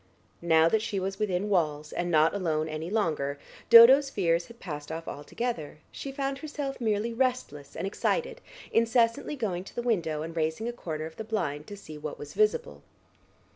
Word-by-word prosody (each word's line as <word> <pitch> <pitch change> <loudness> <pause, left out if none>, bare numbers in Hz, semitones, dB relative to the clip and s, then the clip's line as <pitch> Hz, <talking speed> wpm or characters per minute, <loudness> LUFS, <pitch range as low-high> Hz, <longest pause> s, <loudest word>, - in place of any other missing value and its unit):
Now 160 -1 +4
that 215 +6 +2
she 200 -2 -2
was 195 +1 -4
within 200 -2 0
walls 155 -6 0
and 175 0 -2
not 160 -1 +4
alone 160 -6 -1
any 155 +2 -5
longer 155 -9 -1 0.3
Dodo's 255 +5 +9
fears 170 -7 0
had 235 0 -15
passed 150 -3 -7
off 165 +1 -6
altogether; 155 +1 -4
she 275 - -6
found 275 0 -3
herself 290 -4 -5
merely 220 +1 0
restless 235 - -2
and - - -3
excited, 485 - -1 0.3
incessantly 230 +5 +2
going 195 -9 -2
to - - -13
the 240 - -2
window 165 -10 0
and 165 +1 -7
raising 160 +7 -1
a 240 - -3
corner 155 -9 -5
of 160 0 -10
the 220 - -4
blind 155 -10 -3
to 205 - -8
see 155 -6 -10
what 150 0 -6
was 145 0 -9
visible. 205 - 0
190 Hz, 180 wpm, -28 LUFS, 155-235 Hz, 0.3 s, Dodo's